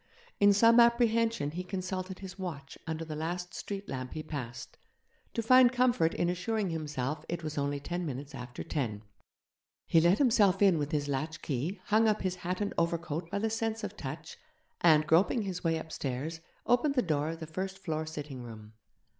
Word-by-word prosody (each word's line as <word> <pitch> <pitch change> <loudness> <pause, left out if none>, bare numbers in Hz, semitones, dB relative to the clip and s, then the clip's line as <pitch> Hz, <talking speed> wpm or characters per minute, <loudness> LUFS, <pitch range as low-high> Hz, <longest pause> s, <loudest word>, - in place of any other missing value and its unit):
In 205 0 +7
some 230 +4 +6
apprehension 230 -8 +3
he 180 +3 -4
consulted 185 0 -4
his 190 0 -9
watch 150 -7 -6
under 160 0 -3
the 155 -1 -5
last 175 +3 -4
street 200 0 -5
lamp 130 -1 -5
he 155 - -5
passed, 125 -6 -6 0.6
to 230 - 0
find 255 +1 +7
comfort 245 -9 +2
in 175 - +1
assuring 180 +2 -1
himself 150 -2 -3
it 170 -1 -3
was 155 -1 -4
only 140 0 -1
ten 175 +5 -3
minutes 140 -2 -5
after 125 -1 -7
ten. 110 -9 -3 0.8
He 165 - +4
let 175 +4 +4
himself 215 -8 +4
in 190 -5 +5
with 145 0 -2
his 145 -2 0
latch 150 +3 -3
key, 150 +8 -2
hung 220 +1 +4
up 215 -2 +1
his 185 -1 -1
hat 180 +2 -3
and 205 - -1
overcoat 170 -1 -1
by 200 - -2
the 220 +2 0
sense 225 0 -2
of 210 0 -4
touch, 155 0 -7 0.4
and, 155 -3 +6
groping 185 +9 +3
his 185 -3 -4
way 165 -1 +2
upstairs, 160 0 -4 0.3
opened 275 +4 +3
the 250 - +3
door 150 -2 0
of 165 0 -5
the 160 - -5
first 190 +4 -4
floor 160 -4 -3
sitting 145 -4 -6
room. 110 -2 -10
170 Hz, 190 wpm, -31 LUFS, 150-200 Hz, 0.8 s, In